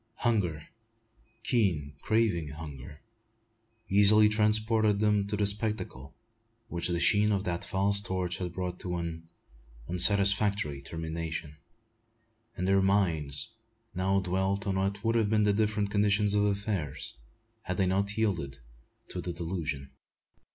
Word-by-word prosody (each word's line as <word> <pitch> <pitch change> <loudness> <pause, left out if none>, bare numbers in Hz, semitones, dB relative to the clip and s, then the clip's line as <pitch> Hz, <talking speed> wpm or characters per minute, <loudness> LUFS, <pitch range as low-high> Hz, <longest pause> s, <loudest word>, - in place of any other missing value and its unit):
Hunger, 90 -11 -1 0.8
keen, 85 - 0
craving 110 -8 +1
hunger, 75 -1 -9 0.9
easily 105 +2 +6
transported 110 0 +2
them 105 -2 +2
to 105 +1 -2
the 105 - +1
spectacle 100 - -3 0.5
which 85 0 -2
the 85 -1 -1
sheen 105 +5 +3
of 100 -2 0
that 85 -3 -2
false 100 +1 +2
torch 90 -3 -2
had 90 -2 -4
brought 90 0 -4
to 90 -1 -4
an 85 -1 -6 0.6
unsatisfactory 100 -4 +3
termination; 80 0 -5 1.0
and 90 - -1
their 95 0 +4
minds 85 -5 +2 0.4
now 95 +2 +1
dwelt 95 +2 -1
on 95 -2 -1
what 100 +1 -2
would 115 - +1
have 110 -3 +2
been 105 -1 +3
the 105 -1 +3
different 105 -1 0
condition 105 0 +2
of 105 0 +3
affairs, 100 -8 -3 0.5
had 90 0 -4
they 95 - +2
not 100 +3 0
yielded 85 -11 -1 0.5
to - - -5
the 90 - -4
delusion. 80 -5 -4
95 Hz, 130 wpm, -29 LUFS, 85-105 Hz, 1.0 s, easily